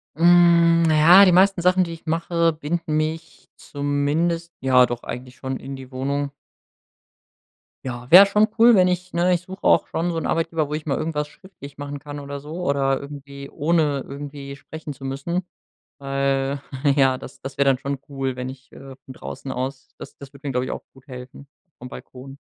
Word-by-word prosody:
Mhm, 170 0 +5
na 155 - +3
ja, 175 +6 +8
die 185 - +5
meisten 190 +1 +4
Sachen, 185 +1 +3
die 170 -1 -5
ich 165 - -13
mache, 165 0 0
binden 155 +1 -3
mich 160 +1 -4
zumindest 150 +4 -2
ja 130 -1 +5
doch, 120 -1 -5
eigentlich 125 +1 -7
schon 130 -1 -5
in 135 0 -8
die 130 -1 -11
Wohnung 140 +2 -2 1.5
Ja, 125 -1 -6
wär 185 +5 +10
schon 210 +2 +3
cool, 235 +1 +7
wenn 185 -2 +5
ich 180 0 -2
ne, 175 +2 +2
ich 175 - 0
such 190 +1 -11
auch - - +3
schon 170 +2 -2
so 165 - -3
'nen - - -5
Arbeitgeber, 165 -2 -1
wo 150 - -6
ich 155 0 -4
mal 140 - 0
irgendwas 155 -2 -2
schriftlich 150 -5 -14
machen 145 0 -6
kann 145 +1 -8
oder 140 0 -7
so 155 +5 -7
oder 135 -1 +1
irgendwie 140 -1 -10
ohne 150 -3 0
irgendwie 140 0 -8
sprechen 155 +1 -9
zu 135 - -11
müssen. 140 +7 -3 0.6
Weil, 135 0 -1 0.4
ja, 135 -2 +3
das - - -12
das 135 0 -8
wär 140 - +2
dann 135 -1 +3
schon 140 +1 -4
cool, 135 -2 -3
wenn 125 0 -5
ich, 130 0 -12
äh, 135 -1 -12
von 130 - -10
draußen 130 +1 -8
aus 130 +1 -5
das - - -11
das 140 0 -12
würd 140 +1 -17
mir, 140 - -3
glaub 125 0 -1
ich, - - -4
auch - - -6
gut 135 +1 -20
helfen, 130 +1 -11 0.3
vom 125 - -9
Balkon. 135 +2 -11
145 Hz, 195 wpm, -22 LUFS, 135-170 Hz, 1.5 s, wär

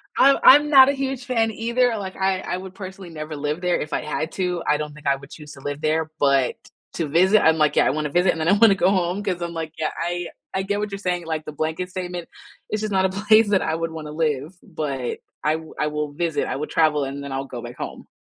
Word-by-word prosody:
I 275 +1 +6
I'm 295 +2 +8
not 270 -2 +8
a - - +2
huge 270 -2 -3
fan 225 -3 +1
either. 235 +2 +1
Like 190 -2 -6
I 190 -1 0
I 180 - -3
would 185 0 -9
personally 190 -1 -9
never 155 -1 -6
live 150 +3 -3
there 180 -1 +1
if 150 - -5
I - - 0
had 155 +2 -3
to, 180 -2 -2
I 150 - +3
don't 150 0 -5
think 150 -1 -9
I 140 - +4
would 135 0 -13
choose 150 -2 -11
to 135 - -13
live 145 +1 -5
there, 155 0 0
but 140 -3 +3 0.4
to 165 - -2
visit, 185 +8 +4
I'm 160 0 +5
like, 150 -1 +2
yeah, - - +4
I - - +3
wanna 150 +1 -2
visit, 180 +4 +3
and 165 - -5
then 160 - 0
I 200 - +5
wanna 205 -1 +6
go 185 -1 +3
home 185 +1 0
'cause 185 -4 -2
I'm 170 0 -3
like, 160 -1 -5
yeah, 160 -1 -1
I, 175 +1 -2 0.3
I 190 - -1
get 205 +1 -1
what 210 0 -3
you're 200 - -4
saying, 180 -3 -2
like 160 -1 -3
the - - -6
blanket 160 +4 -3
statement, 180 -2 -5 0.4
it's 215 - -2
just 215 -1 -3
not 190 -1 +2
a - - +2
place 210 +3 +4
that 200 -2 +3
I - - -1
would 165 0 -3
want 160 -1 -7
to - - -7
live, 150 0 -1
but 145 - -4 0.2
I 150 - +2
wi 160 0 -6
I 150 - +1
will 150 -1 -3
visit, 160 -2 -1
I - - -2
will 150 +3 -3
travel 155 -3 +2
and 140 +1 -5
then 140 - -6
I'll 135 0 -3
go 125 -3 -7
back 120 +1 -9
home. - - -7
170 Hz, 275 wpm, -23 LUFS, 150-195 Hz, 0.4 s, I'm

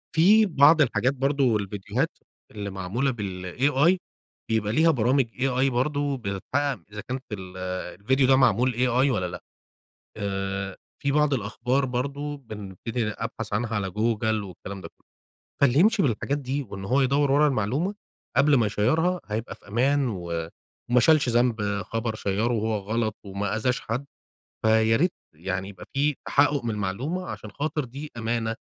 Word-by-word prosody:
في 205 +7 +6
بعض 155 -3 +6
الحاجات 130 -1 +2
برضو، 135 -3 +2
الفيديوهات 100 -1 -2 0.3
اللي 105 -2 -5
معمولة 100 +8 -1
بالAI 125 - +1 0.5
بيبقى 110 -2 0
ليها 160 +5 +5
برامج 130 0 +2 0.2
AI 135 0 +2
برضو 140 +2 0
بتتحقق 125 +5 -2
إذا 105 0 -6
كانت 130 +1 -4
ال 95 -3 -7
آآ، 90 -1 -4
الفيديو 130 +6 +2
ده 135 - +6
معمول 130 -1 +3
AI 125 +3 +2
والّا 95 -7 0
لأ. 90 - -8 0.7
آآ، 95 -1 -3 0.2
في 140 - +1
بعض 150 0 +3
الأخبار 125 +4 0
برضو، 140 +3 -3
بنبتدي 110 0 -5
أبحث 115 0 -5
عنها 115 +2 -1
على 100 -2 -1
جوجل 110 +1 0
والكلام 95 +1 -8
ده 85 - -7
كله. - - -37 0.5
فاللي 140 -1 +4
يمشي 210 +1 +4
بالحاجات 140 +2 0
دي 140 +1 -2
وإن 100 -6 -8
هو 130 +7 +2
يدور 140 +1 +2
ورا 150 +2 +5
المعلومة 135 - 0 0.4
قبل 150 0 +5
ما 120 -5 +4
يشيرها 160 - +1
هيبقى 110 +2 -4
في - - -20
أمان 135 +5 +2
و 85 -5 -4 0.4
وما 125 0 +5
شالش 150 +2 +4
ذنب 115 -4 +1
خبر 115 +4 -3
شيّره 110 +3 0
وهو 110 0 0
غلط 110 +2 -2
وما 100 +1 -2
أذاش 125 +3 0
حد، 125 +5 -3 0.6
فياريت 110 +9 +4 0.2
يعني 95 +4 -4
يبقى 95 -3 -11
في 145 +1 +1
تحقق 145 -1 +3
من 115 - -1
المعلومة؛ 105 - -2
عشان 110 - -7
خاطر 150 +3 -2
دي 140 +5 -8
أمانة، 115 0 -1
120 Hz, 155 wpm, -26 LUFS, 105-140 Hz, 0.7 s, في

